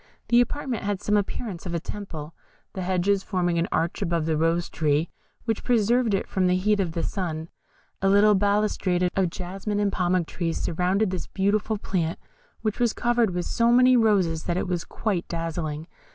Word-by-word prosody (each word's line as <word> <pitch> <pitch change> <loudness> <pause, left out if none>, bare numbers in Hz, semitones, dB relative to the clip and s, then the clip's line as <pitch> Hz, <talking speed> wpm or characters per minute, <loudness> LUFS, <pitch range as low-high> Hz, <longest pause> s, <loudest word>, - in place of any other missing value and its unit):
This 240 0 +6
apartment 255 -2 -2
had 205 -1 -2
some 210 +1 0
appearance 205 -2 -2
of 170 - -3
a - - 0
temple, 160 -5 -7 0.4
the 190 - -4
hedges 190 +2 +1
forming 175 -4 0
an 170 - 0
arch 165 +1 -1
above 170 -2 0
the 160 -1 +1
Rose 165 +2 +1
tree, 150 +1 0 0.3
which 225 -2 -1
preserved 235 -1 +2
it 195 - -1
from 190 -2 +1
the 180 - +3
heat 205 +3 +2
of 175 -4 -1
the 165 - -2
sun; 165 -4 -3 0.5
a 195 - +3
little 205 +2 +6
balustrade 200 -3 +1
of 190 -2 +2
jasmine 195 +4 -4
and 205 -1 +1
pomegranate 180 -1 +1
trees 165 -2 -2
surrounded 185 +4 +1
this 185 - -4
beautiful 210 +2 0
plant, 170 -5 -2 0.5
which 215 -2 -1
was 240 -2 +2
covered 240 -2 +2
with 175 - -1
so 235 0 +2
many 255 +1 +6
roses 195 -9 +2
that 175 0 -1
it - - -1
was 180 -2 -2
quite 195 -6 -2
dazzling. 165 -2 -3
190 Hz, 185 wpm, -25 LUFS, 170-210 Hz, 0.5 s, This